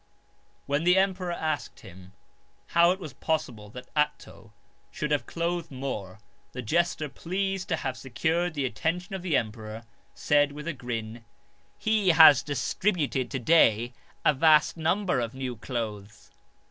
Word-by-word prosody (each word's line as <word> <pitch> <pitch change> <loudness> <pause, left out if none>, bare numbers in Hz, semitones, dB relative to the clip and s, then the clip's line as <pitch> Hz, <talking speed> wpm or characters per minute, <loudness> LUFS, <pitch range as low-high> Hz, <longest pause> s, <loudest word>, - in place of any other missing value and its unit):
When 145 +2 0
the 180 +2 +4
emperor 190 -2 +1
asked 155 -6 -3
him 95 0 -14 0.6
how 170 0 +5
it 185 +2 0
was 155 -8 -8
possible 125 -9 -3
that 125 +3 -10
Atto 150 0 -2 0.4
should 150 0 -4
have 145 - 0
clothed 170 0 -2
more, 130 -8 -5 0.4
the 125 - -5
jester, 165 +4 0
pleased 190 +6 -3
to 165 - +1
have 130 -4 -4
secured 160 +7 -1
the 140 -2 -1
attention 175 - -2
of 190 - -4
the 175 -5 +1
emperor, 110 0 -5 0.3
said 145 -1 +2
with 150 +2 -8
a 170 - -1
grin: 115 -3 -6 0.5
"He 215 -3 +1
has 160 -5 +8
distributed 145 -2 -1
to 135 - -3
day 120 -4 +3 0.3
a 150 - +5
vast 155 +2 +4
number 180 0 0
of 120 0 -3
new 130 -2 -4
clothes." 110 -3 -6
150 Hz, 145 wpm, -27 LUFS, 120-170 Hz, 0.6 s, has